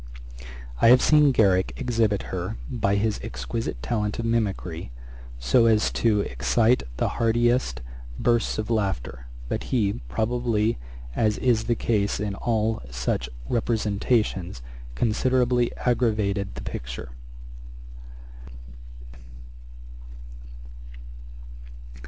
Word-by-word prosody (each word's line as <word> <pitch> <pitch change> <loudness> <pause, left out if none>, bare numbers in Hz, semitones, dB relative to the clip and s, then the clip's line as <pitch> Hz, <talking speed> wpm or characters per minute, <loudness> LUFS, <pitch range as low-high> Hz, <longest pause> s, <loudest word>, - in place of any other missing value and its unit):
I - - +6
have 125 +1 +8
seen 150 -2 +5
Garrick 95 -6 +3
exhibit 115 -6 0
her, - - -3
by 100 -4 +1
his 105 +1 0
exquisite 65 - -5
talent 105 -3 -1
of 115 - -3
mimickry, 100 - -2 0.5
so 115 - +3
as 110 -1 +3
to 105 -3 +2
excite 110 - +2 0.2
the - - +1
heartiest 120 - +2 0.4
bursts 120 -1 +1
of 110 +1 -3
laughter; 85 - -2 0.2
but - - -3
he, 100 - 0
probably, 110 - 0 0.4
as 110 -2 +1
is 120 -3 +1
the 120 - +1
case 105 -3 0
in 105 -1 -2
all 110 +1 -1
such 60 0 -2 0.2
representations, 105 - 0 0.3
considerably 125 - +2
aggravated 105 -5 0
the - - -7
picture. - - -6
110 Hz, 100 wpm, -25 LUFS, 100-120 Hz, 0.5 s, have